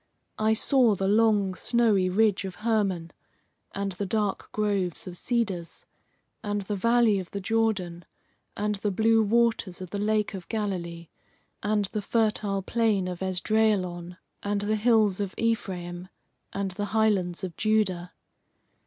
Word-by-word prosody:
I 215 Hz, 0 st, +3 dB
saw 235 Hz, -1 st, +3 dB
the 195 Hz, 0 st, -1 dB
long, 210 Hz, -2 st, +3 dB
snowy 210 Hz, -3 st, +2 dB
ridge 205 Hz, +1 st, +2 dB
of 190 Hz, -2 st, -6 dB
Hermon, 195 Hz, -7 st, 0 dB, 0.6 s
and 200 Hz, 0 st, -3 dB
the 190 Hz, +2 st, -4 dB
dark 210 Hz, -1 st, -1 dB
groves 200 Hz, -5 st, -1 dB
of 180 Hz, -2 st, -7 dB
cedars, 200 Hz, -6 st, -2 dB, 0.6 s
and 205 Hz, -1 st, -2 dB
the 205 Hz, +2 st, -3 dB
valley 230 Hz, 0 st, +3 dB
of 185 Hz, -, -7 dB
the 200 Hz, -, -5 dB
Jordan, 195 Hz, -5 st, -1 dB, 0.5 s
and 210 Hz, +1 st, 0 dB
the 205 Hz, +1 st, -1 dB
blue 225 Hz, +3 st, +3 dB
waters 220 Hz, -4 st, +1 dB
of 185 Hz, -2 st, -8 dB
the 205 Hz, -, -3 dB
Lake 215 Hz, 0 st, 0 dB
of 185 Hz, -3 st, -8 dB
Galilee, 175 Hz, -6 st, -3 dB, 0.5 s
and 210 Hz, -1 st, +1 dB
the 210 Hz, +2 st, -4 dB
fertile 210 Hz, -2 st, 0 dB
plain 215 Hz, -4 st, +1 dB
of 180 Hz, 0 st, -5 dB
Esdraelon, 185 Hz, -2 st, 0 dB, 0.2 s
and 205 Hz, 0 st, -1 dB
the 210 Hz, +1 st, 0 dB
hills 215 Hz, -3 st, +3 dB
of 200 Hz, -2 st, -3 dB
Ephraim, 180 Hz, -6 st, -2 dB, 0.4 s
and 195 Hz, -1 st, -2 dB
the 205 Hz, +3 st, -3 dB
highlands 195 Hz, -5 st, +1 dB
of 180 Hz, -4 st, -5 dB
Judah. 190 Hz, -5 st, 0 dB
205 Hz, 145 wpm, -27 LUFS, 185-220 Hz, 0.6 s, I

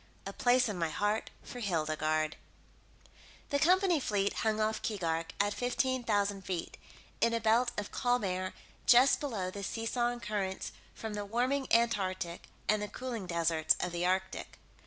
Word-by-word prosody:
A 195 Hz, -, -5 dB
Place 245 Hz, +2 st, +3 dB
in 205 Hz, -4 st, -3 dB
my 165 Hz, -1 st, +1 dB
Heart 210 Hz, +6 st, 0 dB
for 245 Hz, -, -8 dB
Hildegarde 155 Hz, -5 st, 0 dB, 1.2 s
The 285 Hz, -, +2 dB
company 360 Hz, +1 st, +4 dB
fleet 205 Hz, -5 st, 0 dB
hung 220 Hz, -1 st, +1 dB
off 215 Hz, 0 st, 0 dB
Keegark, 165 Hz, -6 st, -1 dB
at 205 Hz, +1 st, +2 dB
fifteen 250 Hz, +2 st, 0 dB
thousand 205 Hz, -3 st, +1 dB
feet, 180 Hz, -3 st, -4 dB, 0.5 s
in 230 Hz, 0 st, +3 dB
a -, -, +1 dB
belt 230 Hz, +2 st, +3 dB
of 205 Hz, -, -3 dB
calm 245 Hz, -1 st, +1 dB
air 185 Hz, -1 st, -2 dB, 0.3 s
just 250 Hz, +3 st, +7 dB
below 210 Hz, -11 st, -3 dB
the 200 Hz, -, -6 dB
seesawing 240 Hz, +4 st, -1 dB
currents 195 Hz, -3 st, -3 dB, 0.2 s
from 220 Hz, -1 st, -5 dB
the 205 Hz, 0 st, -3 dB
warming 250 Hz, +6 st, 0 dB
Antarctic 190 Hz, -7 st, +1 dB, 0.2 s
and 215 Hz, 0 st, +3 dB
the 210 Hz, -, -2 dB
cooling 235 Hz, -5 st, -5 dB
deserts 165 Hz, -2 st, +2 dB
of 180 Hz, -, -1 dB
the 175 Hz, 0 st, -2 dB
Arctic. 190 Hz, +1 st, -1 dB
210 Hz, 155 wpm, -32 LUFS, 185-240 Hz, 1.2 s, just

